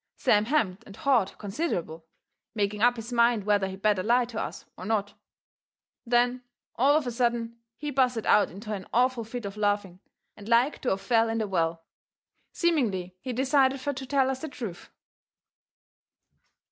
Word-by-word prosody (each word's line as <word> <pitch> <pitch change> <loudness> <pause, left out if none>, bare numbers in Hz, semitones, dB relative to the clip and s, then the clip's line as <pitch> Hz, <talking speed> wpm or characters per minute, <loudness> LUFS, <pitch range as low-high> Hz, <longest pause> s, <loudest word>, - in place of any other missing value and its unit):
Sam 210 -5 +3
hemmed 225 -8 0
and 200 - -11
hawed 245 -8 +1
considerable, 190 - -4 0.5
making 205 0 -1
up 245 +1 +5
his 230 +1 -7
mind 235 -2 +3
whether 205 -1 +2
he 190 - -6
better 200 0 +1
lie 240 +5 +3
to 230 -2 -5
us - - -6
or - - -10
not. 205 0 -1 0.9
Then, 245 +1 +2 0.3
all 280 +5 +4
of 310 - -1
a 245 - -2
sudden, 235 -1 -1 0.2
he 295 0 -4
busted 250 -4 +1
out 210 - +4
into 210 +4 -7
an 190 -3 -6
awful 250 -1 +2
fit 225 +1 -6
of 200 +1 -6
laughing, 205 -3 -1 0.4
and 205 +1 -11
like 245 +5 +3
to 255 - 0
of 190 - -1
fell 225 +2 +2
in 225 - -1
the 220 -2 -1
well. 165 -3 -1 0.7
Seemingly 215 - 0
he 255 - -4
decided 265 +1 +2
fur 285 +2 -2
to 265 0 -7
tell 265 -1 +2
us 265 0 -5
the 315 - -5
truth. 230 -9 -7
230 Hz, 170 wpm, -27 LUFS, 200-255 Hz, 0.9 s, up